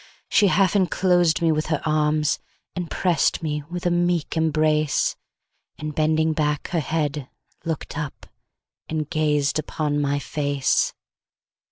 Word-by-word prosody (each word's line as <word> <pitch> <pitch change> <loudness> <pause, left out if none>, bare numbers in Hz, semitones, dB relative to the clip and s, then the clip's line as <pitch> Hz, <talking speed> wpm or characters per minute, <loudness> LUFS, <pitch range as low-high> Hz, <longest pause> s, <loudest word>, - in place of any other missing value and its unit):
She 205 - +4
half 195 0 +3
enclosed 175 -3 +2
me 165 - +4
with 155 0 -1
her 155 -2 0
arms, 150 -1 +1 0.4
She 180 -1 -2
press'd 170 0 +1
me 150 -1 -1
with 175 0 -5
a 175 - +3
meek 175 -2 0
embrace; 155 -1 +2 0.6
And 150 0 -5
bending 155 +1 +2
back 150 -1 -1
her 175 - 0
head, 150 -3 -2 0.4
look'd 160 -3 -4
up, 150 -2 -5 0.6
And 155 -2 -3
gazed 150 -2 +1
upon 150 -1 -1
my 140 0 +1
face. 145 -2 0
155 Hz, 135 wpm, -23 LUFS, 150-165 Hz, 0.6 s, She